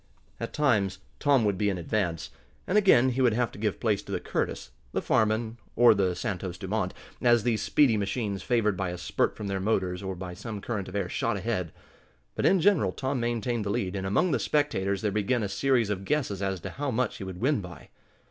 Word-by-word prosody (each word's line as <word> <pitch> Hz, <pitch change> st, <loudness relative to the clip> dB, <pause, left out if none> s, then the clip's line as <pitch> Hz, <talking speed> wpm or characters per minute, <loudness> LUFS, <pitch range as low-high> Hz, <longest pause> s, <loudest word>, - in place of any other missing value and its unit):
At -, -, -4 dB
times 105 Hz, -10 st, +1 dB, 0.2 s
Tom 140 Hz, -6 st, +3 dB
would 100 Hz, -3 st, 0 dB
be 105 Hz, -, +2 dB
in 95 Hz, -, -1 dB
advance, 85 Hz, -2 st, -2 dB, 0.3 s
and 185 Hz, -, -1 dB
again 190 Hz, -, +6 dB
he 130 Hz, +1 st, -1 dB
would 125 Hz, -3 st, +4 dB
have 120 Hz, 0 st, 0 dB
to -, -, -11 dB
give 105 Hz, -4 st, -1 dB
place 105 Hz, -3 st, +1 dB
to -, -, -10 dB
the -, -, -1 dB
Curtis, -, -, -3 dB, 0.2 s
the -, -, +1 dB
Farman, 110 Hz, +1 st, +1 dB, 0.2 s
or 120 Hz, -1 st, +7 dB
the 95 Hz, -3 st, +1 dB
Santos 95 Hz, -2 st, -4 dB
Dumont, 95 Hz, 0 st, -2 dB, 0.3 s
as 120 Hz, -3 st, +4 dB
these 115 Hz, -3 st, +1 dB
speedy 120 Hz, 0 st, +3 dB
machines, 100 Hz, -1 st, -2 dB
favored 105 Hz, -2 st, +1 dB
by 95 Hz, -1 st, -2 dB
a 90 Hz, -, -5 dB
spurt 90 Hz, -, 0 dB
from 105 Hz, -, -6 dB
their 100 Hz, -1 st, -2 dB
motors, 95 Hz, -3 st, 0 dB
or 95 Hz, -1 st, -4 dB
by 90 Hz, 0 st, -6 dB
some 105 Hz, +3 st, -6 dB
current 100 Hz, -2 st, -4 dB
of 95 Hz, -, -8 dB
air, 100 Hz, -3 st, 0 dB
shot 115 Hz, +3 st, -1 dB
ahead. 95 Hz, -5 st, -2 dB, 0.6 s
But, -, -, +1 dB
in 190 Hz, -, +4 dB
general, 170 Hz, -, +3 dB
Tom 135 Hz, -1 st, -2 dB
maintained 120 Hz, -1 st, -1 dB
the 100 Hz, -, -3 dB
lead, 100 Hz, -1 st, -1 dB
and 95 Hz, -1 st, -2 dB
among 105 Hz, -, +2 dB
the -, -, +1 dB
spectators 100 Hz, -10 st, 0 dB
there 105 Hz, -, +1 dB
began 105 Hz, +4 st, 0 dB
a -, -, 0 dB
series 120 Hz, 0 st, +1 dB
of 95 Hz, -1 st, -3 dB
guesses 125 Hz, -6 st, -1 dB
as 95 Hz, -2 st, -1 dB
to -, -, -6 dB
how 145 Hz, 0 st, -3 dB
much 125 Hz, -2 st, -1 dB
he -, -, -6 dB
would 95 Hz, -2 st, -7 dB
win 135 Hz, -1 st, +1 dB
by. 90 Hz, -2 st, -11 dB
105 Hz, 225 wpm, -28 LUFS, 95-120 Hz, 0.6 s, or